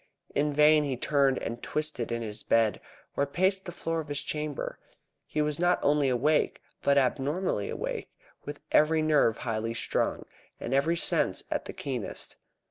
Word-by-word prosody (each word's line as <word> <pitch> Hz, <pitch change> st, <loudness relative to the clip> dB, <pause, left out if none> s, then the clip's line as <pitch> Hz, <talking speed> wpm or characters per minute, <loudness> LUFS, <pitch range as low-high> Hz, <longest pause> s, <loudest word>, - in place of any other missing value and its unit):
In 150 Hz, +1 st, +1 dB
vain 150 Hz, +1 st, +5 dB
he 135 Hz, -3 st, -2 dB
turned 135 Hz, 0 st, +2 dB
and 120 Hz, +1 st, -4 dB
twisted 150 Hz, -6 st, -1 dB
in 115 Hz, 0 st, -2 dB
his 105 Hz, -1 st, -4 dB
bed, 110 Hz, -4 st, +2 dB, 0.3 s
or 140 Hz, -, +1 dB
paced 190 Hz, +5 st, +1 dB
the 175 Hz, -, -5 dB
floor 165 Hz, -1 st, -2 dB
of 155 Hz, -, -5 dB
his 145 Hz, -1 st, -2 dB
chamber. 150 Hz, -2 st, -4 dB, 0.5 s
He 150 Hz, -, 0 dB
was 150 Hz, 0 st, -2 dB
not 175 Hz, +1 st, +3 dB
only 145 Hz, -1 st, +3 dB
awake, 140 Hz, +5 st, +2 dB, 0.2 s
but 140 Hz, 0 st, +3 dB
abnormally 140 Hz, -, 0 dB
awake, -, -, -4 dB, 0.3 s
with 145 Hz, 0 st, -7 dB
every 155 Hz, +1 st, +4 dB
nerve 145 Hz, -8 st, +3 dB
highly 115 Hz, -1 st, -3 dB
strung, -, -, -1 dB, 0.3 s
and -, -, -4 dB
every 155 Hz, +5 st, +2 dB
sense -, -, +1 dB
at -, -, -1 dB
the -, -, -6 dB
keenest. 125 Hz, -6 st, -5 dB
145 Hz, 165 wpm, -28 LUFS, 125-155 Hz, 0.5 s, vain